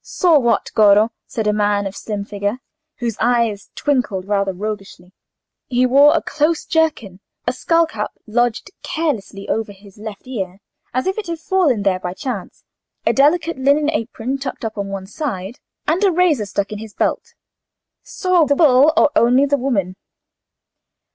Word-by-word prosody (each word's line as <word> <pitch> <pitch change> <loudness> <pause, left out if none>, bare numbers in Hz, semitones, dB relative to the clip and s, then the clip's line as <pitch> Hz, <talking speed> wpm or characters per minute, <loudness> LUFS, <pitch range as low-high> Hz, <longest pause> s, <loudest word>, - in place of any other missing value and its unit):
"Saw 335 -5 +3
what, 235 -3 +1
Goro?" 210 +1 +5 0.2
said 225 - -3
a 210 - +2
man 205 -1 +1
of 195 0 -5
slim 205 -2 -5
figure, 205 +2 -3 0.4
whose 235 -3 -3
eye 235 -2 +2 0.2
twinkled 245 -10 -1
rather 200 -1 0
roguishly. 195 -2 -7 0.5
He 250 0 +2
wore 280 +4 +6
a - - -2
close 310 +2 0
jerkin, 295 - 0 0.3
a - - 0
skull 335 0 +2
cap 220 -9 -4 0.2
lodged 235 +1 0
carelessly 225 - -3
over 220 -1 -2
his 200 0 -17
left 215 0 -8
ear 195 -7 -5 0.3
as 255 +1 -1
if 380 +3 -1
it 420 - -6
had 335 -1 -3
fallen 320 - +1
there 190 -2 +1
by 180 0 -5
chance, 230 -6 -6 0.4
a - - +3
delicate 305 +2 +2
linen 290 +3 +3
apron 250 -1 -3
tucked 260 -3 -5
up 220 - -4
on 200 -1 -3
one 195 -1 -5
side, 210 - -5 0.3
and 340 +6 +1
a 390 - +5
razor 325 - +2
stuck 200 +1 -2
in 210 - -5
his 220 -1 -10
belt. - - -2 0.7
"Saw 365 -3 +1
the 285 - +2
bull, 280 -1 +5
or 290 - +5
only 250 +4 +4
the 285 0 +2
woman?" 205 -9 -1
235 Hz, 165 wpm, -19 LUFS, 205-290 Hz, 0.7 s, wore